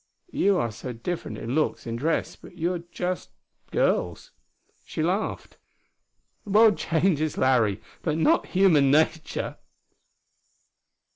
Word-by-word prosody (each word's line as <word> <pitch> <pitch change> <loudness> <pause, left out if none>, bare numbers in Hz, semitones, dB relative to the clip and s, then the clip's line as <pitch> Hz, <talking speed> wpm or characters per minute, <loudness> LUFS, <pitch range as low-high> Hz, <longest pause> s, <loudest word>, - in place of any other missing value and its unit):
You 200 -1 +2
are 115 -9 -1
so 120 +3 -7
different 165 +10 -5
in 115 +2 -4
looks, 155 +1 0
in 115 -1 -4
dress, 155 +8 -1
but 180 - -15
you're 175 +2 -1
just 180 +2 -4 0.4
girls." - - 0 0.5
She - - -4
laughed. - - -2 0.8
"The - - -12
world 215 +1 +5
changes, 160 -2 +1
Larry, 115 -6 +2 0.2
but 155 -2 -1
not 160 - +2
human 170 -8 +4
nature." 155 +2 0
160 Hz, 120 wpm, -25 LUFS, 130-180 Hz, 0.8 s, world